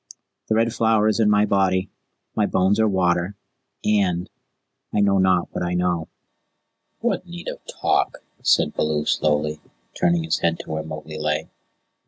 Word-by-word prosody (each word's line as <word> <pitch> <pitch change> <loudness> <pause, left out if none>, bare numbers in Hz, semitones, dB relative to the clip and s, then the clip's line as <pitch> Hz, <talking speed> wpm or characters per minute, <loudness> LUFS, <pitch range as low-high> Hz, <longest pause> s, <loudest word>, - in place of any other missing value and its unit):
The 110 - +3
Red 115 +1 +2
Flower 110 -2 +3
is 110 - 0
in 110 -2 +4
my 105 0 +4
body, 95 -2 +1 0.4
my - - +2
bones 95 +3 +2
are 110 - +4
water 90 -1 +1 0.5
and 95 -4 +1 0.6
I 105 - 0
know 100 -1 +3
not 95 -2 +3
what - - -4
I 90 0 -1
know." 90 -2 0 0.9
"What 230 -5 -1
need 175 0 -9
of - - -5
talk?" - - 0 0.2
said - - +3
Baloo 75 -1 0
slowly, 75 0 +1 0.3
turning 85 -1 +1
his 80 0 0
head 85 0 +1
to - - -10
where 80 0 -2
Mowgli 80 0 -7
lay. 75 0 -1
90 Hz, 160 wpm, -23 LUFS, 80-105 Hz, 0.9 s, in